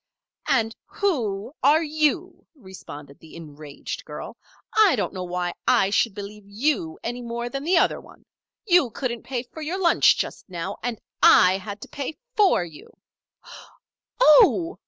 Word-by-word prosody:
"And 225 -4 +1
who 245 - -2
are 300 +5 +4
you?" 310 +4 -1
responded 165 - -12
the 160 - -15
enraged 150 -3 -8
girl. - - -8 0.4
"I 430 -4 +5
don't - - -2
know 185 -1 -5
why 175 0 -3
I 195 - +3
should 210 0 +1
believe 205 +1 -8
you 205 - -1
any 245 +1 -4
more 235 0 -4
than 275 +2 -5
that 355 +2 +3
other - - +2
one. - - -18 0.4
You 355 - +4
couldn't 240 0 -4
pay 250 -2 -4
for 290 +5 -12
your 335 +5 -3
lunch 345 -3 +4
just - - -5
now, 180 +2 -5
and 240 -2 -4 0.2
I 185 +1 +6
had 205 +1 -8
to - - -9
pay 285 +1 -6 0.2
for 390 - +3
you 160 -3 -13 0.7
" - - -17 0.4
"Oh!" 340 -2 +5
235 Hz, 155 wpm, -24 LUFS, 190-310 Hz, 0.7 s, I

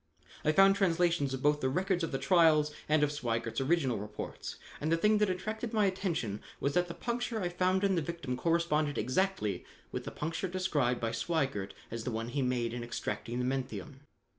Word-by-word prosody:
"I 155 - +4
found 195 +4 +6
translations 170 -6 +2
of 130 - -7
both 150 0 +3
the 130 - +2
records 185 +4 0
of 165 - -1
the 135 - 0
trials 155 0 +4 0.2
and 155 0 +4
of 145 - +2
Sweigert's 115 -4 -2
original 135 -6 +1
reports, 105 +1 -6 0.3
and 155 +2 0
the 165 - +4
thing 210 +4 +3
that 210 -2 +3
attracted 215 +5 -3
my 215 -2 +3
attention 170 - -1 0.2
was 140 - 0
that 180 0 +2
the 170 - -7
puncture 235 -1 -2
I 180 -3 -1
found 185 +2 +1
in 195 -1 +3
the 170 - +2
victim 160 -5 -3
corresponded 155 0 +1
exactly 185 - 0 0.3
with - - -4
the - - -3
puncture 165 +5 -3
described 155 -10 0
by 115 -1 -1
Sweigert 115 - -1 0.2
as 115 0 -4
the 125 - -2
one 115 0 -3
he 140 +3 -1
made 125 -2 0
in 120 -1 -4
extracting 120 0 -4
the 125 - 0
menthium. 135 +1 -3
155 Hz, 200 wpm, -32 LUFS, 125-185 Hz, 0.3 s, found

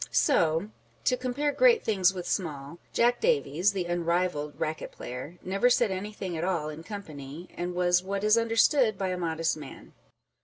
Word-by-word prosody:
So 170 - +2 0.3
(to 255 - +3
compare 255 +4 -1
great 475 - +4
things 190 -4 +3
with 180 -2 -6
small) 150 -3 -3
Jack 240 +1 +2
Davies, 210 - +2
the 190 -3 -2
unrivalled 170 -3 -1
racket 155 0 -3
player, 130 +8 -8
never 195 +6 +2
said 240 -4 +3
anything 190 -1 -4
at 160 - -3
all 170 -5 -1
in 155 +1 -8
company, 160 -5 -8
and 175 0 -4
was 180 0 +3
what 195 +2 -3
is 215 +1 +5
understood 230 0 +3
by 190 -1 -1
a 185 - -1
modest 165 -2 -1
man. 145 -3 -11
185 Hz, 165 wpm, -28 LUFS, 165-215 Hz, 0.3 s, is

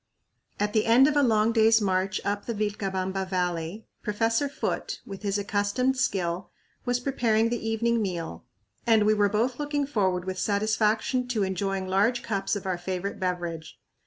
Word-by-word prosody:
At 205 0 0
the 215 0 +2
end 245 +4 +7
of 300 - +1
a 290 - +5
long 220 -3 +3
day's 225 0 +5
march 190 -2 0
up 205 0 -2
the 235 - -2
Vilcabamba 195 -2 -2
Valley, 180 +2 -2 0.2
Professor 225 +6 0
Foote, 285 - -3
with 195 -1 -8
his 205 -1 0
accustomed 205 +6 0
skill, 185 -8 -1 0.4
was 245 -1 +1
preparing 230 -4 +1
the 230 -1 -2
evening 230 +1 +1
meal 170 - -4 0.4
and 220 -2 +5
we 215 - +5
were 205 -1 +3
both 235 +5 0
looking 290 -1 -1
forward 190 -9 0
with 185 0 -4
satisfaction 220 +4 +1
to 230 -5 0
enjoying 190 0 -2
large 205 +6 +2
cups 195 -1 -1
of 200 - -5
our 185 -2 -1
favorite 185 +2 -4
beverage. 175 -3 -3
210 Hz, 165 wpm, -27 LUFS, 190-230 Hz, 0.4 s, end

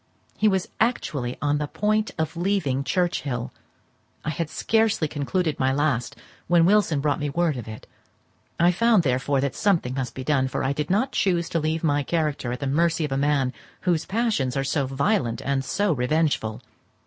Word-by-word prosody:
He 215 - +2
was 190 -3 +1
actually 145 - -1
on 145 0 +1
the 150 - -2
point 215 +5 0
of 160 +1 -2
leaving 170 -7 0
Churchhill! 140 -8 -1 0.7
I 155 - 0
had 155 +1 -3
scarcely 220 -7 +1
concluded 155 +3 -1
my 130 0 +2
last, 135 -4 0 0.3
when 170 -1 +5
Wilson 190 -7 +3
brought 145 +1 0
me 145 -1 -2
word 165 +1 +1
of 120 -4 -7
it. 110 0 -9 0.7
I 175 +1 +5
found, 220 0 +3
therefore, 135 +1 +1
that 140 -2 -1
something 175 -12 +1
must 130 -2 -4
be 130 - -5
done; 135 -1 +1
for - - -3
I 135 - +1
did 150 +1 -3
not 220 +8 +1
choose 175 -6 +1
to 165 - 0
leave 155 +1 -1
my 145 -2 +2
character 150 -5 -1
at 125 - -5
the - - -1
mercy 165 +3 +1
of 145 - -6
a - - 0
man 140 -2 +1 0.3
whose 170 -3 +1
passions 200 - 0
are 135 - +1
so 140 0 0
violent 135 - 0
and 135 -1 -1
so 200 +6 +1
revengeful. 135 -4 0
150 Hz, 185 wpm, -24 LUFS, 135-175 Hz, 0.7 s, when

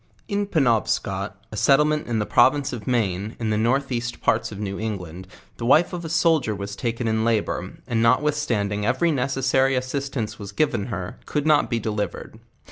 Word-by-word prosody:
In 205 -1 -1
PenobscoU 110 - +1 0.2
a - - -7
settlement 150 +5 +3
in 120 -2 -1
the 105 - 0
province 135 +5 +3
of 110 -4 -7
Maine, 105 -3 -1
in 110 -2 -1
the - - +1
north 130 +5 +1
east 120 0 -3
parts - - +1
of 105 - -7
New 100 -1 -4
England, 95 -5 -5 0.3
the 115 - -4
wife 155 +8 +4
of 175 -1 -4
a 160 - -5
soldier 160 -8 +2
was 100 +1 -6
taken 115 +1 -2
in 110 0 +1
labour, 115 -2 -1
and 115 -2 0
notwithstanding 115 -5 +1
every 130 +10 +2
necessary 135 -1 +1
as 130 0 -1
sistance 130 -5 -3
was 100 -2 -7
given 135 -10 0
her, 95 -6 -5
could 150 -1 -1
not 155 -1 +4
be 120 - 0
delivered. 105 -1 -4
120 Hz, 185 wpm, -23 LUFS, 105-140 Hz, 0.3 s, wife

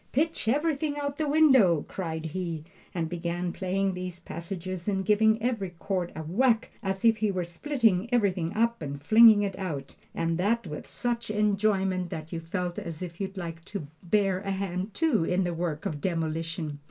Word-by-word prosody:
"Pitch 315 -2 0
everything 290 +3 +1
out 290 - -2
of 280 - -18
the 310 -1 0
window!" 265 - +5
cried 165 -3 -4
he, 165 -1 -3 0.3
and 170 -2 -2
began 175 +1 -3
playing 195 +1 0
these 180 -1 -5
passages 175 +2 -6
and 190 -2 0
giving 220 +1 +4
every 230 -6 0
chord 180 -1 -2
a 160 - -4
whack 225 +8 +2
as 195 +1 -2
if 225 -1 +6
he 215 0 +1
were 185 -2 -1
splitting 225 - +1
everything 190 -8 +1
up 235 0 +1
and 140 -2 -4
flinging 215 +6 +7
it 195 -2 -2
out, 150 -8 -4 0.2
and 165 0 0
that 225 +4 +1
with 150 -3 -7
such 235 -2 -2
enjoyment 200 -3 +1
that 160 +1 -6
you 165 - -2
felt 175 +1 -3
as 165 +1 -6
if 175 +1 -7
you'd 195 0 -4
like 165 -2 -5
to 195 -4 -6 0.2
bear 195 0 +2
a 200 0 -5
hand, 190 0 -2
too, 310 - +2
in 180 +3 +1
the 175 -1 -1
work 165 -2 -3
of 150 -2 -3
demolition! 165 -2 -2
185 Hz, 185 wpm, -28 LUFS, 170-215 Hz, 0.3 s, flinging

